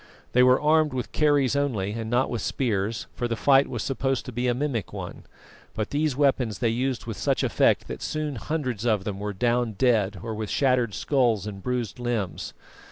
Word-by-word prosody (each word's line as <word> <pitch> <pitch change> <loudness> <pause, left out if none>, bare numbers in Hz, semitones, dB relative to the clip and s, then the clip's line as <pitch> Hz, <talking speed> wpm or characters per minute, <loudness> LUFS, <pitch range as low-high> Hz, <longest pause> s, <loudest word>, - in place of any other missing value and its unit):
They 125 - +4
were 125 +1 +6
armed 155 -1 +3
with 125 -2 -4
kerries 145 -3 +2
only, 120 -9 0
and 110 0 -4
not 125 +3 +2
with 120 -3 -2
spears, 110 -3 -1
for 120 - -2
the 115 - -1
fight 135 +3 +4
was - - -4
supposed 135 -1 -1
to - - -6
be 125 +1 -1
a 120 - +2
mimic 130 -6 -2
one; - - -7 0.5
but 110 -1 -3
these 150 -1 0
weapons 130 -7 +2
they 115 - +1
used 125 +1 -1
with 115 -4 -5
such - - 0
effect - - +2
that - - -6
soon 150 -3 -3
hundreds 130 -4 -3
of 110 -5 +1
them 100 -1 -4
were 105 0 -3
down 120 +2 0
dead 105 -3 +2
or 115 -1 -4
with 105 -1 -4
shattered 125 -6 +1
skulls 120 -8 +1
and 100 -2 -6
bruised 125 -2 -3
limbs. 110 -9 -3
120 Hz, 200 wpm, -25 LUFS, 110-135 Hz, 0.5 s, were